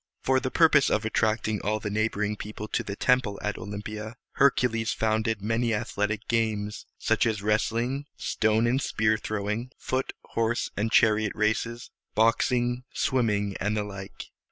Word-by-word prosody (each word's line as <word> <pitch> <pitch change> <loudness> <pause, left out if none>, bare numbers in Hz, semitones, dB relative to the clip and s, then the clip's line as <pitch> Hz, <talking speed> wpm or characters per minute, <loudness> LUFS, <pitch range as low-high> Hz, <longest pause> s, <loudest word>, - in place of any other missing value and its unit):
] - - -57
For 130 0 +4
the 130 - -2
purpose 150 -1 +5
of 110 +1 +1
attracting 110 -1 0
all 105 +1 0
the 105 -1 -4
neighboring 105 0 0
people 105 0 -7
to - - 0
the 100 -4 -5
temple 125 -4 +2
at 105 -1 -2
Olympia, 105 +3 -6 0.2
Hercules 125 -5 +2
founded 110 -1 0
many 115 +1 +1
athletic 105 +1 -2
games, 110 -2 -1
such - - +2
as 105 -3 -1
wrestling, 115 +6 0
stone 110 +1 +1
and 125 +3 +2
spear 110 -3 +1
throwing, 110 +4 -3
foot, 130 +1 -2 0.2
horse, 115 +1 0
and 110 +2 -1
chariot 110 -1 +4
races, 110 +2 -1 0.2
boxing, 120 +2 +2
swimming, 105 -6 0
and 105 +2 0
the 105 - 0
like. 100 -1 -8
110 Hz, 155 wpm, -27 LUFS, 105-120 Hz, 0.2 s, purpose